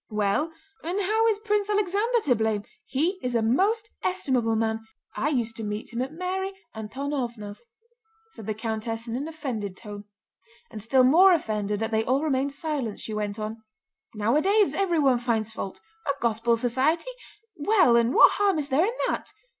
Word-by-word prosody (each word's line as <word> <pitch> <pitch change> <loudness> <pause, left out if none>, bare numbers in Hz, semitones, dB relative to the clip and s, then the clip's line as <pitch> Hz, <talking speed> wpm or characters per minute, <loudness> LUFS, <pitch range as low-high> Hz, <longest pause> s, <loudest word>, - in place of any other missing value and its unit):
"Well, 215 +9 0 0.3
and 350 +5 -2
how 435 +3 +2
is 440 -2 +2
Prince 420 -1 0
Alexander 420 +4 +1
to 280 -10 +3
blame? 220 -2 0 0.2
He 340 +8 0
is 250 -1 -2
a 230 - +2
most 410 - +1
estimable 255 -11 0
man. 220 0 0 0.4
I 290 - 0
used 235 -6 -1
to 225 - -5
meet 210 +2 -5
him 235 - -1
at 265 +2 -3
Mary 375 +3 -3 0.2
Antónovna's," 235 - -5 0.6
said 220 - -11
the 215 - -1
countess 225 +1 -4
in 230 - -3
an 280 +5 -3
offended 245 - -5
tone; 205 -2 -9 0.7
and 220 -2 -7
still 255 +5 +3
more 355 +9 +7
offended 210 -9 -1
that 225 0 -1
they 220 0 +2
all 260 +5 +1
remained 280 -2 0
silent, 280 -7 -3
she 220 - -5
went 210 -1 -3
on: 220 +1 -5 0.5
"Nowadays 310 - +3
everyone 315 -10 +2
finds 225 -3 -1
fault. 195 -3 -6 0.3
A 280 - +2
Gospel 230 0 +1
Society! 265 - 0 0.4
Well, 345 - +4
and 235 0 +3
what - - +8
harm 400 -4 +3
is 295 -1 -2
there 310 +8 +3
in 460 - -1
that?" - - -3
255 Hz, 170 wpm, -26 LUFS, 220-345 Hz, 0.7 s, what